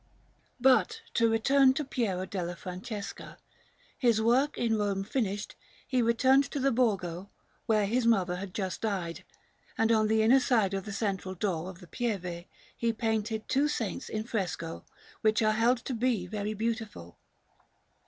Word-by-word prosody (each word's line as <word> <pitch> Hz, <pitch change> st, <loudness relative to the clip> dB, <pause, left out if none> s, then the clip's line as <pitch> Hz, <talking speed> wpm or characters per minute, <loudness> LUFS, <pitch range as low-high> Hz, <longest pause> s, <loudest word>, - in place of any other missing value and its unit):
Panel_)] -, -, -37 dB, 0.5 s
But 265 Hz, -, +3 dB
to 230 Hz, -1 st, +3 dB
return 265 Hz, +4 st, +4 dB
to 300 Hz, -, -2 dB
Piero 205 Hz, -9 st, -1 dB
della 175 Hz, -3 st, -4 dB
Francesca; 190 Hz, +4 st, -7 dB, 0.6 s
his 235 Hz, -5 st, +3 dB
work 250 Hz, +6 st, +2 dB
in 230 Hz, -2 st, +1 dB
Rome 200 Hz, -2 st, 0 dB
finished, 205 Hz, -2 st, -2 dB, 0.3 s
he 255 Hz, -2 st, +1 dB
returned 260 Hz, +4 st, +4 dB
to 285 Hz, -, -3 dB
the 275 Hz, +1 st, +2 dB
Borgo, 200 Hz, -6 st, 0 dB, 0.4 s
where 215 Hz, -2 st, +3 dB
his 235 Hz, +3 st, +1 dB
mother 185 Hz, -6 st, +2 dB
had 190 Hz, 0 st, -6 dB
just 190 Hz, -3 st, -3 dB
died; 185 Hz, -6 st, -3 dB, 0.5 s
and 225 Hz, 0 st, +3 dB
on 215 Hz, -1 st, +3 dB
the 220 Hz, 0 st, +3 dB
inner 250 Hz, +5 st, +6 dB
side 220 Hz, -7 st, +2 dB
of 195 Hz, -1 st, -3 dB
the 210 Hz, -, -6 dB
central 195 Hz, -2 st, -2 dB
door 180 Hz, -2 st, -2 dB
of 185 Hz, 0 st, -11 dB
the 180 Hz, -, -12 dB
Pieve 180 Hz, -7 st, -3 dB, 0.3 s
he 235 Hz, 0 st, 0 dB
painted 220 Hz, -1 st, -2 dB
two 280 Hz, +3 st, +2 dB
saints 225 Hz, -10 st, -3 dB
in 215 Hz, 0 st, -3 dB
fresco, 185 Hz, -7 st, -4 dB, 0.4 s
which 220 Hz, 0 st, +3 dB
are 215 Hz, -, +4 dB
held 235 Hz, +3 st, +3 dB
to 265 Hz, -, -3 dB
be 230 Hz, -5 st, 0 dB
very 210 Hz, +2 st, -3 dB
beautiful. 220 Hz, -, -4 dB
220 Hz, 165 wpm, -29 LUFS, 190-235 Hz, 0.6 s, inner